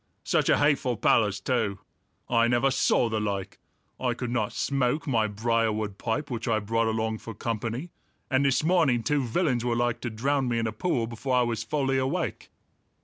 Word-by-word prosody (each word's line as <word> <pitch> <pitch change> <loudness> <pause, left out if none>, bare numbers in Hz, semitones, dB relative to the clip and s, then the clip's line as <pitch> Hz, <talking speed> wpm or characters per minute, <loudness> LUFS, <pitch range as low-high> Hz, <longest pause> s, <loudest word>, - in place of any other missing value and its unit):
Such - - +1
a - - +5
hateful 140 -5 +2
palace 105 -2 +2
too! 110 -3 -1 0.5
I 115 -1 +3
never 120 +3 +2
saw 125 - +2
the 110 -1 -1
like! 100 -2 -3 0.4
I 125 -2 0
could 120 0 -4
not 110 -4 0
smoke 140 +1 0
my 115 -6 +1
briarwood 110 -1 -1
pipe 140 +5 -2
which 115 -2 -4
I 115 -2 +2
brought 115 +2 0
along 110 0 -1
for 115 - -8
company, 115 - -3 0.4
and 135 0 +2
this 135 0 +2
morning 155 -9 +3
two 145 0 +1
villains 125 -1 0
were 120 -1 0
like 120 0 0
to 120 - -3
drown 135 +4 0
me 120 -1 0
in 115 - 0
a 110 - -1
pool 120 +1 -1
before 120 +3 -2
I 125 - +4
was 120 -2 -2
fully 135 -3 0
awake." 155 +7 -2
120 Hz, 190 wpm, -27 LUFS, 110-135 Hz, 0.5 s, a